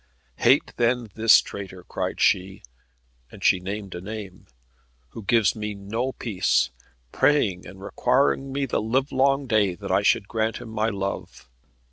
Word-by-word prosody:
"Hate - - +3
then 120 -1 +1
this 110 +2 +6
traitor," 95 -2 -9
cried - - -4
she, 95 +1 +1 0.7
and - - -12
she 95 - +4
named 100 +1 -6
a 90 - -6
name 100 -2 -8 0.6
"who 115 - -9
gives 110 0 +2
me 105 -1 -4
no 110 +6 -3
peace, 95 - 0 0.4
praying 100 -12 +1
and 95 0 -12
requiring 135 +5 +1
me 140 +1 -1
the 130 - -1
livelong 135 +4 +1
day 105 -6 +2
that - - -6
I - - +3
should 100 - +2
grant 110 +1 -1
him 115 - -9
my 110 0 0
love. 100 -2 -5
110 Hz, 150 wpm, -24 LUFS, 95-120 Hz, 0.7 s, this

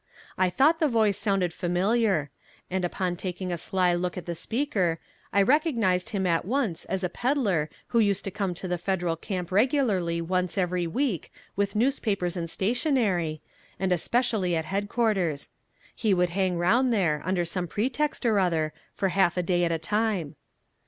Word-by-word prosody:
I 185 -1 +2
thought 295 - +3
the 310 - +3
voice 220 -5 +2
sounded 195 -5 0
familiar, 180 - +1 0.4
and 190 0 -1
upon 180 0 -1
taking 180 0 -4
a - - 0
sly 180 +1 +1
look 175 +1 -2
at 180 - -5
the 175 - -3
speaker 190 - -1 0.3
I 200 - +4
recognized 230 - +2
him 195 -3 -1
at 170 -2 +2
once 230 - -1
as 190 0 -2
a - - +2
peddler 200 - 0 0.2
who 235 - +2
used 200 -3 +2
to 195 - -4
come 190 -2 -2
to 185 - -6
the 180 -1 -2
Federal 175 -2 -1
camp 180 +1 -5
regularly 205 - +2
once 180 +2 -1
every 180 -2 0
week 230 - -1 0.2
with 200 0 -1
newspapers 210 -7 0
and 170 -2 -3
stationery, 195 - 0 0.4
and 190 0 0
especially 190 0 +1
at 160 -1 -1
headquarters. 200 -5 0 0.4
He 210 -4 +1
would 180 -1 +1
hang 185 -1 0
round 235 +9 +3
there, 170 -9 +1
under 180 -1 0
some 175 +1 -2
pretext 260 - -1
or 220 -3 +3
other, 160 -4 +1 0.2
for 195 - 0
half 185 -2 +2
a 180 - +1
day 175 0 +2
at 170 - 0
a 165 - +1
time. 205 -2 -1
190 Hz, 170 wpm, -27 LUFS, 175-220 Hz, 0.4 s, I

